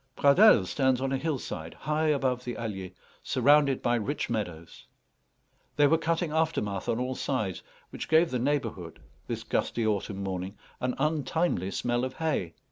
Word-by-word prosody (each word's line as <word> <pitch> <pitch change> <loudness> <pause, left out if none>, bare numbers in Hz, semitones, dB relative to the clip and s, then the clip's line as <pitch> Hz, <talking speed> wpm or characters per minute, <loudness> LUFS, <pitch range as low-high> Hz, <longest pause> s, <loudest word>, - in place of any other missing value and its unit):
Pradelles 145 - +6
stands 130 +1 +1
on 135 0 -1
a 135 - +1
hillside, 130 - -4
high 155 +2 -1
above 130 -4 +1
the 120 -1 -5
Allier, 95 -5 -5 0.3
surrounded 140 +1 +3
by 120 - +2
rich 120 +3 -2
meadows. 90 -7 -5 0.9
They 145 - +5
were 160 +3 +4
cutting 165 0 -1
aftermath 155 -12 -1
on 115 - 0
all 130 +1 -1
sides, 110 -9 -2 0.3
which - - -6
gave 160 +2 +4
the 125 - -1
neighbourhood, 115 - -2 0.3
this - - -4
gusty 115 - -1
autumn 100 -2 -1
morning, 95 +1 -4 0.2
an 125 0 -1
untimely 150 - 0
smell 120 +4 -1
of 130 - -3
hay. 150 - -2
125 Hz, 155 wpm, -28 LUFS, 105-150 Hz, 0.9 s, Pradelles